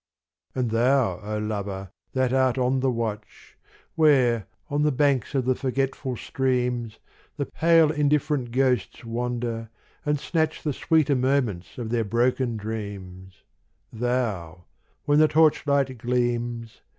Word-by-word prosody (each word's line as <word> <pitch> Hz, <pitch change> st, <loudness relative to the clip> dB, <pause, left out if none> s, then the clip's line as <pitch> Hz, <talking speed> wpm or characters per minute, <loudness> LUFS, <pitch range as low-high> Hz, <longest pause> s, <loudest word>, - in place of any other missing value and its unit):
And 125 Hz, -3 st, -1 dB
thou, 125 Hz, +2 st, +2 dB
O 105 Hz, +1 st, -4 dB
lover, 100 Hz, -3 st, -4 dB, 0.2 s
that 130 Hz, -1 st, +1 dB
art 130 Hz, -1 st, +2 dB
on 130 Hz, +1 st, +1 dB
the 130 Hz, 0 st, +1 dB
watch, 110 Hz, -3 st, -5 dB, 0.4 s
Where, 130 Hz, -, +3 dB, 0.2 s
on 145 Hz, +1 st, -1 dB
the 150 Hz, 0 st, +3 dB
banks 140 Hz, -2 st, +1 dB
of 130 Hz, -3 st, +1 dB
the 130 Hz, -, +3 dB
forgetful 135 Hz, 0 st, -2 dB
streams. 125 Hz, -4 st, -1 dB, 0.4 s
The 140 Hz, -, -1 dB
pale 165 Hz, 0 st, +4 dB
indifferent 150 Hz, -3 st, +1 dB
ghosts 125 Hz, -6 st, 0 dB
wander, 115 Hz, -1 st, -3 dB, 0.3 s
and 150 Hz, -1 st, 0 dB
snatch 160 Hz, +1 st, -1 dB
The 150 Hz, -, -1 dB
sweeter 150 Hz, -1 st, +2 dB
moments 125 Hz, -8 st, 0 dB
of 115 Hz, -3 st, -5 dB
their 120 Hz, -1 st, +1 dB
broken 120 Hz, +2 st, 0 dB
dreams, 100 Hz, -3 st, -7 dB, 0.2 s
— -, -, -39 dB
Thou, 110 Hz, -8 st, -2 dB, 0.4 s
when 145 Hz, +1 st, +4 dB
the 155 Hz, -, +6 dB
torchlight 145 Hz, -4 st, +3 dB
gleams. 120 Hz, -1 st, -2 dB
125 Hz, 130 wpm, -25 LUFS, 115-135 Hz, 0.4 s, the